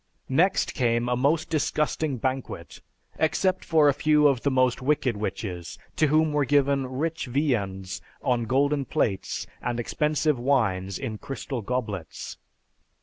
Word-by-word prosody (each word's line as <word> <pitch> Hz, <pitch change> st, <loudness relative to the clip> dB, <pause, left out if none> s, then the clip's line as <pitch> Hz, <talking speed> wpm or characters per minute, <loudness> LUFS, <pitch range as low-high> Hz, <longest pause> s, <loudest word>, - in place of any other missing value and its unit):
Next 175 Hz, +9 st, +2 dB
came 120 Hz, -1 st, +1 dB
a 125 Hz, -, +1 dB
most 145 Hz, +6 st, +1 dB
disgusting 150 Hz, -2 st, 0 dB
banquet, 130 Hz, +2 st, -4 dB, 0.4 s
except 185 Hz, +4 st, +1 dB
for 155 Hz, -3 st, +4 dB
a 145 Hz, -, +5 dB
few 150 Hz, +1 st, +4 dB
of 135 Hz, -4 st, +2 dB
the 140 Hz, -, +1 dB
most 130 Hz, -1 st, +2 dB
wicked 130 Hz, -3 st, +1 dB
witches, 95 Hz, -4 st, -5 dB, 0.2 s
to 155 Hz, -, +4 dB
whom 155 Hz, +1 st, +3 dB
were 145 Hz, -1 st, +2 dB
given 140 Hz, -1 st, +2 dB
rich 155 Hz, +4 st, -3 dB
viands 100 Hz, -9 st, -1 dB, 0.2 s
on 120 Hz, -3 st, +1 dB
golden 140 Hz, +4 st, +2 dB
plates 100 Hz, -6 st, -1 dB, 0.2 s
and 120 Hz, -1 st, -2 dB
expensive 150 Hz, +2 st, 0 dB
wines 100 Hz, -8 st, +1 dB
in 110 Hz, -1 st, -5 dB
crystal 135 Hz, -2 st, -5 dB
goblets. 105 Hz, -7 st, -4 dB
130 Hz, 140 wpm, -26 LUFS, 120-150 Hz, 0.4 s, a